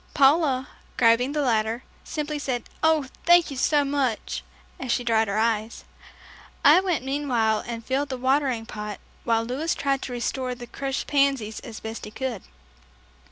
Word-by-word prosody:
Paula, 275 Hz, -2 st, +4 dB, 0.3 s
grabbing 240 Hz, +3 st, +4 dB
the 300 Hz, -1 st, 0 dB
ladder, 225 Hz, -1 st, +1 dB, 0.2 s
simply 300 Hz, -1 st, -3 dB
said, 255 Hz, -4 st, -2 dB, 0.2 s
"Oh, 320 Hz, -3 st, +3 dB, 0.2 s
thank 345 Hz, -2 st, +5 dB
you -, -, -5 dB
so 290 Hz, +2 st, +3 dB
much," 275 Hz, -5 st, -1 dB, 0.4 s
as 255 Hz, -2 st, -3 dB
she 240 Hz, +1 st, +1 dB
dried 225 Hz, -2 st, +2 dB
her 200 Hz, +1 st, -1 dB
tears. 220 Hz, 0 st, 0 dB, 0.8 s
I -, -, +9 dB
went 355 Hz, -9 st, -1 dB
meanwhile 250 Hz, -6 st, +1 dB
and 230 Hz, -1 st, -5 dB
filled 275 Hz, +2 st, 0 dB
the 260 Hz, -, -3 dB
watering 260 Hz, -2 st, +1 dB
pot 210 Hz, -3 st, -6 dB, 0.3 s
while 230 Hz, -1 st, +2 dB
Louis 270 Hz, +8 st, -1 dB
tried 275 Hz, -1 st, 0 dB
to -, -, -5 dB
restore 250 Hz, +1 st, -2 dB
the 245 Hz, 0 st, -9 dB
crushed 270 Hz, +2 st, -3 dB
pansies 275 Hz, -7 st, +1 dB
as 230 Hz, -5 st, -9 dB
best 220 Hz, +1 st, -6 dB
he -, -, -7 dB
could. 240 Hz, -3 st, -4 dB
255 Hz, 160 wpm, -25 LUFS, 230-280 Hz, 0.8 s, I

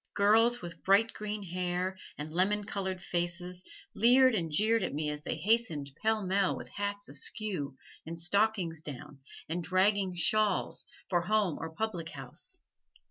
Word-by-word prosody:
Girls 225 Hz, +3 st, +4 dB
with 170 Hz, -1 st, -8 dB
bright 205 Hz, +4 st, +4 dB
green 210 Hz, -1 st, -4 dB
hair, 180 Hz, +1 st, -2 dB, 0.2 s
and 150 Hz, +1 st, -6 dB
lemon 205 Hz, +4 st, +2 dB
colored 190 Hz, -2 st, -3 dB
faces, 175 Hz, 0 st, -3 dB, 0.3 s
leered 255 Hz, +3 st, +6 dB
and 170 Hz, -7 st, -1 dB
jeered 220 Hz, +7 st, +3 dB
at -, -, -2 dB
me 150 Hz, 0 st, -1 dB
as 150 Hz, 0 st, -6 dB
they -, -, -3 dB
hastened 200 Hz, -10 st, +1 dB
pellmell 200 Hz, -3 st, +2 dB
with -, -, -8 dB
hats 205 Hz, 0 st, -3 dB
askew, 145 Hz, -, -3 dB, 0.3 s
and 165 Hz, +1 st, -6 dB
stockings 175 Hz, -2 st, +1 dB
down, 145 Hz, -2 st, -9 dB, 0.3 s
and 170 Hz, +2 st, -2 dB
dragging 190 Hz, +2 st, +2 dB
shawls, 210 Hz, +2 st, +1 dB, 0.2 s
for 175 Hz, -2 st, +2 dB
home 200 Hz, -1 st, +1 dB
or 160 Hz, -, -4 dB
public 170 Hz, -1 st, -3 dB
house. 135 Hz, -3 st, -7 dB
185 Hz, 145 wpm, -31 LUFS, 165-210 Hz, 0.3 s, leered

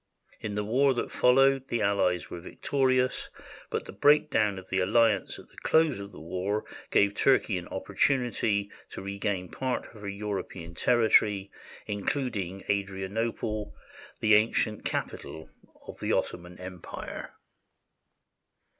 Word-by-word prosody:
In 105 Hz, -2 st, -4 dB
the 105 Hz, -, 0 dB
war 130 Hz, +5 st, +3 dB
that -, -, -2 dB
followed 135 Hz, +1 st, +4 dB
the 115 Hz, -2 st, -1 dB
allies 100 Hz, -3 st, +1 dB
were 85 Hz, -, -5 dB
victorious, 130 Hz, +5 st, 0 dB, 0.4 s
but -, -, -2 dB
the -, -, -8 dB
breakdown 105 Hz, -3 st, +3 dB
of 95 Hz, 0 st, -9 dB
the 95 Hz, -, +2 dB
alliance 105 Hz, +1 st, +2 dB
at -, -, -14 dB
the -, -, -24 dB
close 160 Hz, -7 st, +3 dB
of 100 Hz, 0 st, -8 dB
the -, -, -11 dB
war 95 Hz, +5 st, -2 dB, 0.2 s
gave 100 Hz, 0 st, +4 dB
Turkey 125 Hz, -4 st, +3 dB
an 90 Hz, -, -10 dB
oppor 95 Hz, +1 st, -7 dB
tunity 110 Hz, -5 st, +1 dB, 0.2 s
to -, -, -8 dB
regain 100 Hz, -1 st, -2 dB
a -, -, -14 dB
part 130 Hz, -1 st, -2 dB
of 110 Hz, -, -13 dB
her 100 Hz, -, -4 dB
European 100 Hz, -4 st, -5 dB
territory, 105 Hz, -2 st, +3 dB, 0.3 s
including 100 Hz, -3 st, -2 dB
Adrianople, 100 Hz, +2 st, -2 dB, 0.5 s
the 110 Hz, -1 st, +4 dB
ancient 105 Hz, 0 st, +3 dB
capital 80 Hz, 0 st, -4 dB, 0.3 s
of -, -, -10 dB
the -, -, 0 dB
Ottoman 90 Hz, 0 st, -2 dB
Empire. 90 Hz, -1 st, -8 dB
105 Hz, 135 wpm, -28 LUFS, 95-120 Hz, 0.5 s, followed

